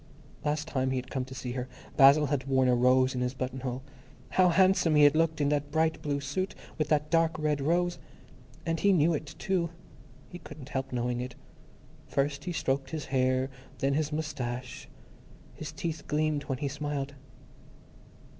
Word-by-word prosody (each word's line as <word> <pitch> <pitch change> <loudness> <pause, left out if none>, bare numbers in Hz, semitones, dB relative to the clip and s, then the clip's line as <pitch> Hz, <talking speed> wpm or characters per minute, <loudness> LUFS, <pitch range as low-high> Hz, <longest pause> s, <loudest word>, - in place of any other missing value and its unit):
_ - - -21
Last 150 0 -1
time 130 -1 0
he 130 - 0
had 125 0 -4
come 130 -2 -2
to 130 0 -10
see 125 -1 -4
her, 125 0 -3 0.3
Basil 140 +2 +7
had 140 -2 -1
worn 130 -1 +3
a 125 - +4
rose 130 +1 +4
in 125 - -2
his 125 +1 -1
buttonhole. 130 0 -4 0.5
How 185 -1 +4
handsome 185 -3 +4
he 150 - +6
had 145 +1 +6
looked 160 0 +2
in 145 -1 +2
that 145 -1 0
bright 160 +1 +1
blue 145 -1 -1
suit, 140 +8 -3 0.2
with 155 - +1
that 150 0 +1
dark 165 -1 +3
red 150 -2 0
rose! 175 +4 +1 0.7
And 165 -1 0
he 200 -1 +4
knew 165 -1 +4
it, 150 0 -4
too. 180 -2 0 0.6
He 175 - -8
couldn't 150 -4 -11
help 135 -2 -3
knowing 120 0 -1
it. 125 0 -6 0.7
First 140 +2 -1
he 180 - -2
stroked 135 -4 -1
his 155 +1 -4
hair, 130 0 +2 0.3
then 135 +1 +1
his 150 +1 0
moustache; 130 -5 -4 0.6
his 155 - -7
teeth 165 -4 -5
gleamed 150 -1 0
when 135 - -2
he 140 +2 -2
smiled. 145 0 -3
145 Hz, 185 wpm, -29 LUFS, 130-155 Hz, 0.7 s, Basil